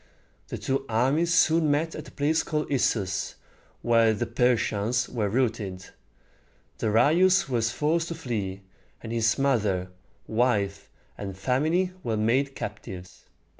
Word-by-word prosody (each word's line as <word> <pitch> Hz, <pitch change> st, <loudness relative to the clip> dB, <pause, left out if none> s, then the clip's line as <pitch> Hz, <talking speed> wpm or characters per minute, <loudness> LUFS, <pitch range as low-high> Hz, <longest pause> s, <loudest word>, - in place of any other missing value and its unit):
The -, -, -5 dB
two 135 Hz, 0 st, -1 dB
armies 135 Hz, +9 st, +2 dB
soon 165 Hz, -3 st, +4 dB
met 155 Hz, +3 st, +1 dB
at -, -, -8 dB
a -, -, -12 dB
place 155 Hz, +2 st, +1 dB
called 150 Hz, -2 st, -3 dB
Is´sus, 100 Hz, -8 st, 0 dB, 0.5 s
where 115 Hz, -2 st, +4 dB
the 120 Hz, -, -2 dB
Persians 120 Hz, -1 st, +1 dB
were 105 Hz, -4 st, -2 dB
routed. 110 Hz, -6 st, -2 dB, 0.9 s
Darius 155 Hz, -, +4 dB
was 115 Hz, -3 st, 0 dB
forced 165 Hz, +6 st, 0 dB
to 170 Hz, -, -5 dB
flee, 105 Hz, -10 st, -4 dB, 0.4 s
and 115 Hz, -, -6 dB
his 115 Hz, -1 st, +1 dB
mother, 105 Hz, -10 st, 0 dB, 0.3 s
wife, 110 Hz, -4 st, 0 dB, 0.3 s
and 95 Hz, -2 st, -6 dB
family 155 Hz, -, +1 dB
were 115 Hz, -8 st, -2 dB
made 130 Hz, +6 st, +1 dB
captives. 95 Hz, -3 st, -8 dB
120 Hz, 130 wpm, -26 LUFS, 105-145 Hz, 0.9 s, soon